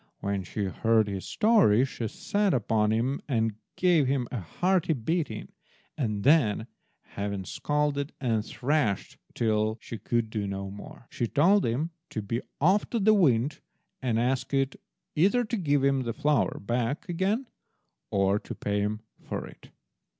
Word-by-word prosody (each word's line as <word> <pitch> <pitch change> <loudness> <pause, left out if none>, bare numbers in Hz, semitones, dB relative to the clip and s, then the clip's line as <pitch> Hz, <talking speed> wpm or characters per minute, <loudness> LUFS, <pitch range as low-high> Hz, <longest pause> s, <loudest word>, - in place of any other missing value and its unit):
When 100 -1 -2
she 105 +3 -4
heard 110 +3 +2
his 100 -2 -4
story 205 - +4
she 120 -4 -4
set 205 - 0
upon 110 -2 +1
him 120 +6 0
and 115 -5 +1 0.2
gave 175 -7 +3
him 130 -2 0
a 125 - -2
hearty 175 - +1
beating, 145 -2 -2 0.5
and 105 -8 -2
then, 125 -7 +4 0.4
having 100 -1 -4
scolded 145 +2 -1
and 115 -5 0
thrashed 130 -5 -1 0.2
till 110 -1 +1
she 115 - -8
could 115 +1 -1
do 105 -3 -2
no 100 0 -4
more, 100 +4 -11
she 120 - -1
told 185 - +4
him 140 +9 -1 0.2
to 110 - -4
be 115 +4 -2 0.2
off 185 +8 +3
to 235 - -1
the 215 +1 +5
wind 140 - +3 0.4
and 120 -4 +1
ask 130 +3 0
it 135 0 +1 0.4
either 200 +10 +3
to 230 +1 -2
give 145 -8 +1
him 135 -1 +3
the 120 -2 -3
flour 150 +4 +1
back 120 - -2
again 190 +8 0 0.6
or 100 +1 +2
to - - -8
pay 105 0 -1
him 105 +1 -1 0.2
for - - -5
it. - - -14
125 Hz, 155 wpm, -28 LUFS, 110-155 Hz, 0.6 s, the